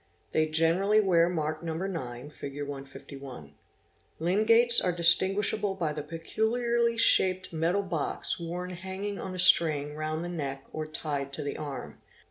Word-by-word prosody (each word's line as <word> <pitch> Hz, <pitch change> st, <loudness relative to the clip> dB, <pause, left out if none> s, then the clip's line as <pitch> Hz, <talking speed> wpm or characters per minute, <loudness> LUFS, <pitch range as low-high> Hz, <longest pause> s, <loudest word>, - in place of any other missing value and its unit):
They 155 Hz, 0 st, +1 dB
generally 165 Hz, +7 st, +2 dB
wear 175 Hz, -4 st, +3 dB
mark 155 Hz, -2 st, -3 dB
No. 165 Hz, -2 st, -4 dB
9 150 Hz, -8 st, -5 dB
(Fig. 140 Hz, -1 st, -8 dB
151). 135 Hz, -, -9 dB, 0.7 s
Lingaits 225 Hz, +7 st, +5 dB
are 180 Hz, -, +2 dB
distin 175 Hz, +3 st, +4 dB
guishable 205 Hz, -1 st, -1 dB
by 160 Hz, -5 st, -1 dB
the 150 Hz, -, -4 dB
peculiarly 230 Hz, +9 st, -1 dB
shaped 185 Hz, -5 st, +3 dB
metal 170 Hz, +5 st, 0 dB
box 170 Hz, -3 st, -2 dB
worn 175 Hz, +2 st, -5 dB
hanging 190 Hz, +3 st, -5 dB
on 185 Hz, -1 st, -6 dB
a -, -, -6 dB
string 155 Hz, -5 st, +5 dB
round 155 Hz, +2 st, -4 dB
the -, -, -4 dB
neck 140 Hz, -6 st, -5 dB
or 155 Hz, 0 st, -4 dB
tied 145 Hz, -3 st, -3 dB
to 140 Hz, -, -3 dB
the 145 Hz, -, -4 dB
arm. 140 Hz, -4 st, -7 dB
170 Hz, 150 wpm, -28 LUFS, 150-190 Hz, 0.7 s, Lingaits